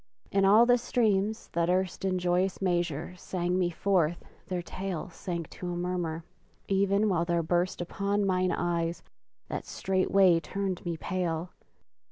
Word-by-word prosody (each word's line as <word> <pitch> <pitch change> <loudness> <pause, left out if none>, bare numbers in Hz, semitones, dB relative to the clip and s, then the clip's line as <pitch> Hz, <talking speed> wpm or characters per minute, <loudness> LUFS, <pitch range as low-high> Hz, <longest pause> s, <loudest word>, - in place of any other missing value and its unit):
and 195 -1 +3
all 215 +4 +7
the 245 0 +4
streams 220 -3 0
that 170 0 0
erst 185 0 0
In 190 -1 +1
joyous 180 +1 +1
measure 175 -3 -1
sang 180 0 -1
me 180 -1 +2
forth 175 -2 +1 0.2
their 180 -2 -2
tale 185 0 -5
Sank 170 -1 -4
to 180 -1 -5
a - - -3
murmur; 175 -2 -2 0.4
even 200 +2 +2
while 175 -4 +2
there 170 -1 0
burst 175 +2 0
Upon 200 +3 -1
mine 185 -1 +2
eyes 170 -1 -1 0.4
that - - -4
straightway 190 -2 +3
turned 195 +1 -3
me 170 -1 -2
pale! 175 -1 -2
180 Hz, 150 wpm, -29 LUFS, 175-195 Hz, 0.4 s, all